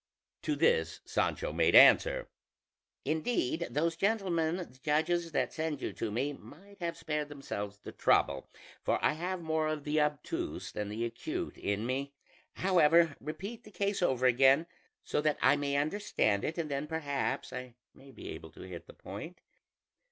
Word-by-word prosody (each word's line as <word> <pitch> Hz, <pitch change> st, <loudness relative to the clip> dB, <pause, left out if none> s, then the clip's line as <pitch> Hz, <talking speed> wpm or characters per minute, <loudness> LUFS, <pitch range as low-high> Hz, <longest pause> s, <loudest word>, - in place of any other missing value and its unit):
To -, -, 0 dB
this 475 Hz, 0 st, +2 dB
Sancho -, -, -1 dB
made -, -, +3 dB
answer: -, -, +7 dB, 0.8 s
"Indeed, 160 Hz, -, 0 dB
those 165 Hz, +3 st, 0 dB
gentlemen 175 Hz, -5 st, +1 dB
the 180 Hz, -1 st, -4 dB, 0.2 s
judges 165 Hz, +3 st, +1 dB
that 130 Hz, -5 st, 0 dB
send 155 Hz, -3 st, -2 dB
you -, -, -4 dB
to 115 Hz, -, -3 dB
me 130 Hz, +7 st, -1 dB
might 195 Hz, +8 st, -14 dB
have 170 Hz, -1 st, -3 dB
spared 150 Hz, -1 st, -2 dB
themselves 105 Hz, -8 st, -5 dB
the 105 Hz, -, -9 dB
trouble, 70 Hz, -1 st, +2 dB, 0.3 s
for -, -, +2 dB
I -, -, +4 dB
have 175 Hz, +3 st, -3 dB
more 160 Hz, -1 st, 0 dB
of 155 Hz, -1 st, -2 dB
the 150 Hz, +1 st, +1 dB
obtuse 150 Hz, -, -2 dB
than 105 Hz, -1 st, -4 dB
the 110 Hz, +3 st, -2 dB
acute 320 Hz, -, -4 dB
in 100 Hz, +2 st, -2 dB
me; 135 Hz, +3 st, -2 dB, 0.4 s
however, 170 Hz, -3 st, +4 dB
repeat 200 Hz, -, -6 dB
the -, -, -13 dB
case 200 Hz, 0 st, -1 dB
over 130 Hz, -7 st, +2 dB
again 135 Hz, +5 st, +5 dB, 0.4 s
so -, -, 0 dB
that 150 Hz, -1 st, +1 dB
I -, -, +5 dB
may 140 Hz, -1 st, -1 dB
understand 145 Hz, -, +1 dB
it, 160 Hz, -, -2 dB
and 160 Hz, -3 st, -2 dB
then 140 Hz, +2 st, -2 dB
perhaps 145 Hz, -4 st, -2 dB
I 125 Hz, -1 st, -7 dB, 0.2 s
may 135 Hz, +1 st, -16 dB
be -, -, -9 dB
able 80 Hz, 0 st, -8 dB
to -, -, -12 dB
hit 90 Hz, -2 st, -9 dB
the -, -, -12 dB
point." 105 Hz, -, -8 dB
150 Hz, 165 wpm, -32 LUFS, 135-175 Hz, 0.8 s, answer